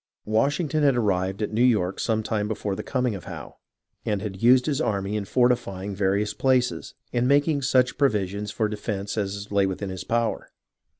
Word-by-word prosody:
Washington 145 +8 +1
had 140 -4 +4
arrived 95 -2 0
at 105 - -3
New 110 - +1
York 105 -7 +2
some 110 -1 0
time 105 -1 -1
before 105 -2 -3
the 105 - -4
coming 125 0 -1
of 95 - -8
Howe, - - -9 0.5
and 105 -2 -1
had 95 -2 -6
used 125 +2 +5
his 150 0 0
army 100 -3 -1
in 105 -2 -2
fortifying 105 -5 0
various 100 +2 0
places, 125 -10 0 0.2
and 120 0 +1
making 145 +1 +3
such 130 -1 +2
provisions 105 -6 0
for 110 +2 0
defence 105 -1 -4
as 100 -1 -3
lay 100 -1 +3
within 95 +1 -4
his 95 - -6
power. 115 0 -1
105 Hz, 180 wpm, -25 LUFS, 100-125 Hz, 0.5 s, used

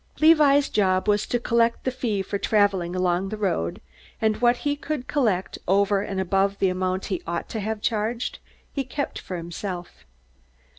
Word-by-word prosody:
Levi's 300 -3 +6
job 185 -1 +1
was 210 0 +2
to 245 - 0
collect 235 0 +1
the 260 - 0
fee 230 -6 -1
for 200 - -3
traveling 195 -4 +2
along 180 +1 +1
the 215 - -4
road, 175 - -1 0.4
and 220 -1 +1
what 240 +1 +3
he 290 0 +2
could 290 -2 -4
collect 215 -11 0
over 200 +1 +3
and 195 -2 -3
above 195 +1 +1
the 190 - +2
amount 185 +1 -1
he 180 - -2
ought 170 0 -3
to 220 - -4
have 215 +1 -3
charged, 225 +2 -1 0.3
he 275 - -1
kept 280 +3 -4
for 180 - -6
himself. 175 +1 -6
205 Hz, 170 wpm, -24 LUFS, 185-240 Hz, 0.4 s, Levi's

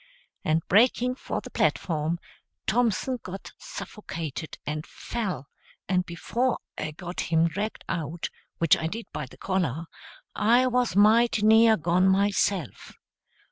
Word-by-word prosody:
And 160 +1 +1
breaking 245 +4 +4
for 255 - -4
the - - -11
platform, 165 0 0 0.5
Thompson 235 +2 +1
got 185 +1 -8
suffocated 165 - -6
and 150 +1 -3
fell; 185 - -4 0.4
and 180 -1 +1
before 235 +9 -1 0.2
I 155 - -3
got 175 +3 -5
him 165 0 +4
dragged 205 +6 -4
out, 165 0 -3 0.3
which 165 -2 +5
I 160 - -2
did 225 +7 -5
by 140 - -4
the - - -16
collar, 170 -5 -1 0.5
I 240 +4 +4
was 250 -3 +1
mighty 220 +2 +5
near 220 0 +7
gone 175 +3 +2
myself. 195 -2 +1
190 Hz, 130 wpm, -27 LUFS, 165-225 Hz, 0.5 s, near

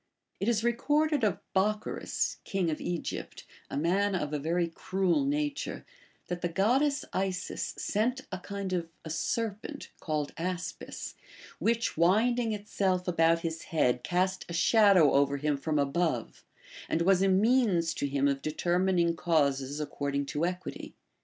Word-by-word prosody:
It 200 - +1
is 225 -2 +1
recorded 290 +4 +1
of 205 -5 +2 0.2
Bocchoris, 210 +3 0
king 185 -4 -1
of 155 - -4
Egypt, 175 -1 -4 0.2
a - - -4
man 190 +6 +1
of 150 -4 -2
a 150 - 0
very 170 +4 0
cruel 185 - 0
nature, 290 0 -2 0.4
that 175 0 -4
the 175 - 0
goddess 260 - +2
Isis 190 -1 -2
sent 245 +6 0
a 185 - -4
kind 200 0 -5
of 170 -2 -2 0.2
a 160 - -5
serpent 225 - -3
(called 150 -2 -2
aspis), 180 +1 -4 0.5
which 230 -4 0
winding 225 +7 +3
itself 195 -3 -1
about 165 -1 +3
his 165 -1 -3
head 125 -6 +1
cast 185 +1 0
a - - -5
shadow 185 - +5
over 140 0 +3
him 150 +1 0
from 150 +2 -1
above, 150 +4 -1 0.5
and 165 - +1
was 190 +1 +4
a 195 - +4
means 195 -4 +3
to 140 - -2
him 140 0 +1
of 140 -1 0
determining 175 +2 +1
causes 145 -4 +1
according 140 -1 -2
to 150 +4 -1
equity. 180 0 -6
180 Hz, 145 wpm, -29 LUFS, 160-210 Hz, 0.5 s, shadow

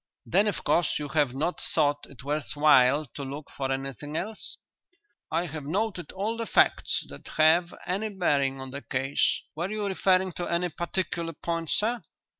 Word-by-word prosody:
"Then, 200 +5 +3
of 205 - -2
course, 170 - +2
you 145 -1 -4
have 145 -4 +1
not 160 +6 -1
thought 145 -2 +1
it 130 -3 -12
worth 150 +2 -2
while 145 -1 +5
to 140 - -5
look 140 +2 -7
for 135 -1 -2
anything 135 +3 -4
else?" 215 +5 -3 0.7
"I 165 +2 0
have 155 -2 -6
noted 185 +4 -2
all 210 +4 -2
the 230 -1 -3
facts - - +3
that - - -10
have 165 +3 +5
any 200 +4 -1
bearing 140 -9 +1
on 135 0 -7
the 140 +2 -5
case. 135 +1 +1
Were 170 +4 -2
you 215 0 -2
referring 190 -1 +2
to 175 - -2
any 175 +1 +1
particular 170 -1 -3
point, 165 0 -3
sir?" 230 +2 +1
160 Hz, 175 wpm, -27 LUFS, 145-185 Hz, 0.7 s, while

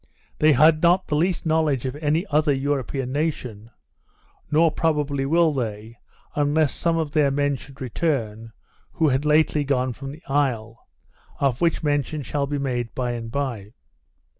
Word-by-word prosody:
They 155 0 +5
had 155 +4 +5
not 180 +2 +4
the 150 - -2
least 175 +4 0
knowledge 155 -5 +1
of 130 +1 -3
any 155 +4 0
other 150 0 +3
European 135 -1 -2
nation, 130 -8 -3 0.8
nor 160 +2 +4
probably 150 -4 0
will 165 +1 +3
they, 115 -2 -5 0.3
unless 145 0 +1
some 170 -1 0
of 160 -3 -2
those 145 -2 +2
men 145 0 +1
should 135 +1 -13
return 115 -5 -2 0.4
who 160 -4 +2
had 135 +2 0
lately 150 0 +3
gone 130 -2 0
from 135 +3 -8
the 155 +3 -13
isle, 125 -5 -1 0.5
of 135 -3 0
which 170 -2 +1
mention 145 0 -1
shall 140 +2 -2
be 145 +1 -2
made 125 -4 -3
bye 125 -1 -1
and 115 -1 -5
bye. 120 -7 -4
145 Hz, 160 wpm, -23 LUFS, 130-155 Hz, 0.8 s, They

